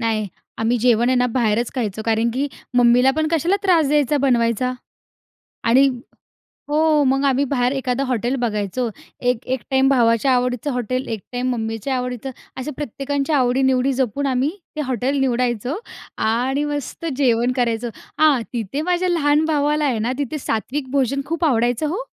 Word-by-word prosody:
नाही, 220 -2 0 0.3
आम्ही 225 +2 +1
जेवण 240 0 +3
आहे 255 - +3
ना, 250 0 +3
बाहेरच 235 -1 0
खायचो. 220 -4 -3
कारण 225 +1 +2
की 280 +2 0 0.3
मम्मीला 245 +2 +5
पण 315 0 +1
कशाला 335 +4 +2
त्रास 335 -6 +3
द्यायचा 295 -1 +2
बनवायचा. 240 0 +1 0.9
आणि 260 +4 +5 0.8
हो, 305 0 +3
मग 270 +1 +2
आम्ही 275 0 +2
बाहेर 250 -2 +1
एखादं 265 -1 -1
हॉटेल 250 0 -1
बघायचो, 220 +1 -1 0.3
एक 245 -1 0
एक 260 - -8
टाईम 265 0 +4
भावाच्या 235 0 +3
आवडीचं 250 +3 -1
हॉटेल, 250 +1 -2
एक 225 -2 -3
टाईम 250 +1 -1
मम्मीच्या 225 +2 -2
आवडीचं, 250 0 -3 0.3
असं 300 +4 -4
प्रत्येकांच्या 285 +2 -1
आवडी-निवडी 260 +1 +2
जपून 265 +2 -1
आम्ही 260 +2 +1 0.3
ते 305 - -2
हॉटेल 260 +1 -1
निवडायचो 250 - 0 0.4
आणि 250 +6 0
मस्त 290 +2 -5
जेवण 245 -3 +2
करायचो. 240 -2 0 0.3
हां, 300 -5 +5
तिथे 235 +4 -3
माझ्या 360 +2 0
लहान 305 -2 +2
भावाला 300 -1 +1
आहे 240 -5 0
ना, 235 +3 0
तिथे 290 +2 -3
सात्विक 260 +2 -3
भोजन 275 0 +1
खूप 330 +2 -1
आवडायचं 245 +1 +1
हो. 400 +11 -3
255 Hz, 155 wpm, -21 LUFS, 240-285 Hz, 0.9 s, मम्मीला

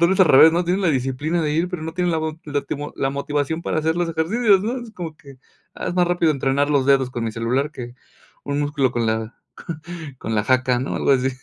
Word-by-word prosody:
tal 170 - +5
vez 190 - +2
al 185 - +7
revés, 155 +2 +7
¿no? 175 +2 +1
Tienen 180 +3 0
la 185 - +3
disciplina 135 +5 -1
de 150 -2 0
ir, 165 +3 +1
pero 180 -3 -5
no 160 +1 -5
tienen 180 0 0
la 160 - +1
la - - -3
mo 155 - -14
latimo 145 0 -4
la 135 - 0
motivación 145 +3 -2
para 160 - -1
hacer 160 +1 0
los 175 -1 0
ejercicios, 190 +5 +2
¿no? 235 +5 -2
Es 235 - -10
como 170 -7 -7
que, 140 -3 -15 0.4
ah, - - -6
es 175 - -3
más 180 -1 +3
rápido 175 -2 +2
entrenar 140 0 +1
los 140 -3 +2
dedos 135 -2 +3
con 120 -2 -4
mi 110 - -3
celular 125 +6 -1
que 120 -3 -8 0.5
un 140 0 -2
músculo 145 -3 0
con 120 -2 0
la 110 +1 -2 0.8
con 110 - -4
la 105 -1 +1
jaca, 130 -1 +2
¿no? 130 - -3
Algo - - +2
así. 130 -1 +2
145 Hz, 250 wpm, -21 LUFS, 130-170 Hz, 0.8 s, al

